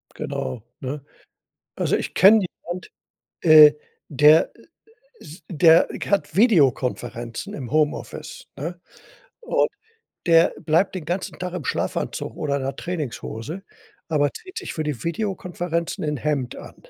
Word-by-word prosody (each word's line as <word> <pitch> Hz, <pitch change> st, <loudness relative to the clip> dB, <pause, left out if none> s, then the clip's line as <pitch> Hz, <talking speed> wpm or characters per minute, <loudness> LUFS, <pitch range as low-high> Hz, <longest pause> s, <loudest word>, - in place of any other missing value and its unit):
Genau, 65 Hz, -, -4 dB, 0.2 s
ne? 140 Hz, +2 st, -5 dB, 0.7 s
Also, -, -, 0 dB
ich -, -, -3 dB
kenne 200 Hz, +3 st, +6 dB, 0.2 s
jemand, 175 Hz, 0 st, -6 dB, 0.5 s
äh, 155 Hz, -2 st, +9 dB, 0.3 s
der 150 Hz, +2 st, +5 dB
i -, -, -19 dB, 0.6 s
ist 155 Hz, +5 st, -13 dB
der 165 Hz, 0 st, +5 dB, 0.2 s
hat 170 Hz, -6 st, 0 dB
Videokonferenzen 125 Hz, -, +1 dB
im 130 Hz, -5 st, -7 dB
Homeoffice, 150 Hz, 0 st, -2 dB
ne? 165 Hz, +5 st, -6 dB, 0.6 s
Und 470 Hz, -, +1 dB, 0.6 s
der 165 Hz, -1 st, +5 dB
bleibt 170 Hz, +4 st, +1 dB
den 175 Hz, -5 st, -5 dB
ganzen 175 Hz, +4 st, -4 dB
Tag 180 Hz, 0 st, -4 dB
im 180 Hz, -5 st, -5 dB
Schlafanzug -, -, -3 dB
oder 140 Hz, -2 st, -1 dB
in -, -, -4 dB
'ner 135 Hz, -, -3 dB
Trainingshose, 155 Hz, -, -5 dB, 0.5 s
aber 145 Hz, -2 st, +2 dB
zieht 370 Hz, -, -11 dB
sich -, -, -5 dB
für 155 Hz, -, -3 dB
die 145 Hz, -7 st, -4 dB
Videokonferenzen 175 Hz, -2 st, -3 dB
'n 150 Hz, -1 st, -1 dB
Hemd 140 Hz, -3 st, -2 dB
an. -, -, -11 dB
155 Hz, 130 wpm, -23 LUFS, 145-175 Hz, 0.7 s, äh